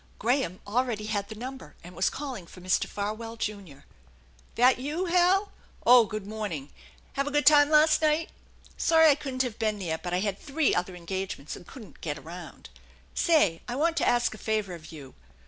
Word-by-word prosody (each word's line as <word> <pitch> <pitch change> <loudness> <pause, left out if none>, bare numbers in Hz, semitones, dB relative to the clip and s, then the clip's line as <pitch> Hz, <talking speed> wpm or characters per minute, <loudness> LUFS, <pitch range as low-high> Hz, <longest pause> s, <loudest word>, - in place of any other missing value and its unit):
Graham 240 -5 0
already 225 0 -1
had 205 -2 -2
the 220 - -7
number, 260 +4 -8
and 175 +1 -12
was 185 - +2
calling 260 -11 -6
for 185 - -13
Mr. 185 +1 +1
Farwell, 215 +3 -4
Junior. 200 -10 -6 0.3
" - - -30
That 250 +2 +4
you, 300 +8 -2
Hal? 365 +3 +3 0.3
Oh, 245 -1 +8
good 215 -2 -5
morning! 200 -10 -5 0.4
Have 275 +1 -1
a - - -2
good 295 0 +1
time 295 -1 +7
last 310 +1 +5
night? 310 +1 +1 0.5
Sorry 320 -1 +5
I - - +6
couldn't 270 -2 -2
have 245 -4 -5
been 215 -2 0
there, 165 -5 -3
but 175 +1 -5
I 180 +1 0
had 200 -1 -2
three 295 0 0
other 180 +1 -1
engagements 180 -3 -5
and - - -13
couldn't 215 - -13
get 150 -2 -3
around. 170 +5 -10 0.4
Say, 295 - +3
I 245 - -3
want 325 +4 +1
to - - +2
ask 240 -1 +2
a 220 - -11
favor 215 -4 -1
of 165 -1 -10
you. 145 -5 -11
220 Hz, 195 wpm, -27 LUFS, 180-280 Hz, 0.5 s, Oh